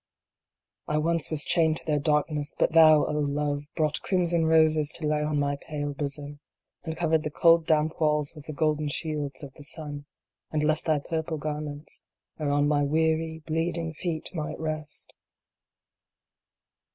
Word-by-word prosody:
I 150 - 0
once 165 +1 +1
was 155 -2 +1
chained 160 -2 +2
to - - -6
their 150 -2 +1
darkness, 150 0 0
but - - +2
thou, 155 -2 +7
O - - -2
Love, 145 0 -1
brought 155 -2 0
crimson 175 -3 +1
roses 155 -2 +4
to 160 - -3
lay 150 0 +1
on 150 -1 0
my 145 0 0
pale 145 0 -4
bosom, 145 0 -5 0.4
and 160 0 -5
covered 160 -2 +2
the 155 - -3
cold 165 +1 +4
damp 155 +1 +1
walls 150 -2 +1
with 150 -3 -11
the 155 - -5
golden 155 0 0
shields 150 -2 -3
of 135 -2 -9
the 145 - -13
sun, 145 -1 -7 0.4
and 155 -1 0
left 155 +1 +1
thy 155 -2 +3
purple 160 +2 -3
garments 150 0 -5 0.4
whereon 145 -1 +1
my 145 -1 +2
weary 160 +2 0
bleeding 165 0 -1
feet 160 -1 -3
might 155 -2 -4
rest. 155 -1 -4
155 Hz, 160 wpm, -27 LUFS, 145-160 Hz, 0.4 s, thou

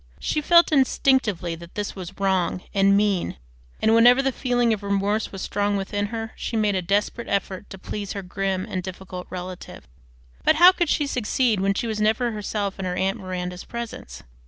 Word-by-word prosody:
She 305 - -1
felt 340 +3 +5
instinctively 260 - +2
that 170 +1 -11
this 205 -1 -3
was 185 -1 -9
wrong 185 -2 0
and 200 0 +4
mean, 200 -3 0 0.4
and 220 - +3
whenever 245 +4 +6
the 270 - +1
feeling 245 -3 +1
of 215 - -4
remorse 200 +2 0
was 195 - -6
strong 205 0 0
within 205 +1 -2
her 225 0 -5
she 230 - -3
made 210 -2 +2
a 190 - 0
desperate 205 +6 -1
effort 200 0 -2
to 195 - -9
please 200 +1 -5
her 200 -2 -5
grim 190 0 -2
and 185 -4 -3
difficult 185 0 -8
relative. 180 0 -8 0.6
But - - +4
how 350 +3 +9
could 345 -4 -1
she 295 - +1
succeed 245 -3 0
when 195 +1 +1
she 235 - -2
was 215 -2 -2
never 225 +3 +2
herself 205 -2 -3
in 190 - -3
her 180 -1 -2
aunt 190 +1 0
Miranda's 180 -1 -5
presence? 235 - -7
205 Hz, 190 wpm, -24 LUFS, 190-230 Hz, 0.6 s, how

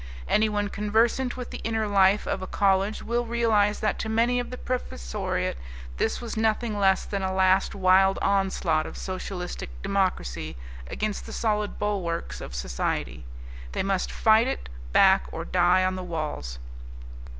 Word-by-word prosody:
Anyone 210 -1 +1
conversant 225 +5 +1
with 250 - -6
the - - -6
inner 225 -1 -1
life 200 0 +4
of 190 - -2
a 185 - -5
college 195 +2 +1
will 240 +1 0
realize 220 -3 +2
that 215 - 0
to 220 - -3
many 235 +3 +2
of 245 - -4
the 250 - -6
professoriate 65 - -3 0.4
this - - 0
was 235 -2 -6
nothing 220 0 0
less 190 -1 +3
than 200 -1 -3
a 190 0 -1
last 190 +1 +3
wild 190 0 +4
onslaught 190 -5 +1
of - - -9
socialistic 185 - -5
democracy 185 - -1 0.3
against 210 - -3
the - - -8
solid 210 -2 -1
bulwarks 190 -5 -2
of - - -7
society. - - -3 0.5
They - - -1
must 195 -1 -1
fight 220 +2 +4
it 270 - -4 0.2
back 190 - +5
or 165 - -5
die 180 +1 +3
on 185 - +1
the 185 - -5
walls. 155 - -4
195 Hz, 155 wpm, -26 LUFS, 185-220 Hz, 0.5 s, back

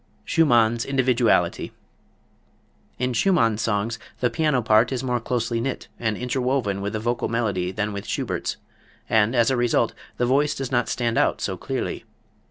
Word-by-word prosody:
Schumann's 120 -7 +3
Individuality. 130 -3 +1 1.2
In 125 0 -1
Schumann's 115 - +2
songs 115 +1 -1 0.2
the 125 - +1
piano 150 -6 +1
part 110 +2 +4
is 130 -1 -2
more 125 -2 0
closely 115 -1 -1
knit 135 +2 -4
and 110 -3 -1
interwoven 125 -5 -1
with 100 +2 -3
the 110 - -1
vocal 120 +2 -1
melody 100 -6 -1
than 105 +1 -2
with 100 0 -6
Schubert's, - - -2 0.5
and, 110 +2 +3
as 120 +1 +3
a - - +2
result, 120 -1 +1 0.2
the 125 - +1
voice 145 +4 +2
does 135 -2 -4
not 120 -2 +1
stand 115 -2 0
out - - +2
so - - -2
clearly. - - -4
120 Hz, 160 wpm, -23 LUFS, 110-125 Hz, 1.2 s, part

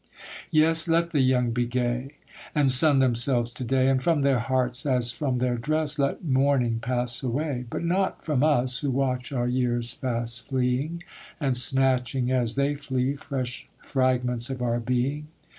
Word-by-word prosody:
Yes, 160 +1 +4
let 170 +1 +1
the 150 - +1
young 125 -2 +2
be 120 +1 -1
gay, 125 +3 -2 0.4
And 145 -3 +3
sun 140 +2 +5
themselves 120 -1 +2
to 130 - -6
day; 130 +2 +1
And 135 -1 +2
from 160 0 +1
their 135 -2 +2
hearts, 125 +1 -1
as 125 -4 +1
from 130 0 -2
their 125 -1 0
dress, 150 +2 -1
Let 140 +5 -1
mourning 130 -4 +1
pass 120 0 -2
away. 130 0 -2
But - - -4
not 185 +3 -1
from 150 -5 0
us, 130 -4 +2
who 145 - -2
watch 130 -1 -1
our 120 -3 -1
years 120 -1 0
fast 120 -3 -2
fleeing, 135 +6 -1 0.4
And 135 -5 0
snatching 130 0 +1
as 120 -3 0
they 140 +1 +1
flee, 135 -1 -2
fresh 130 -3 -5
fragments 125 -2 0
of 130 -1 -4
our 120 -1 0
being. 125 +5 -2
130 Hz, 165 wpm, -25 LUFS, 125-140 Hz, 0.4 s, sun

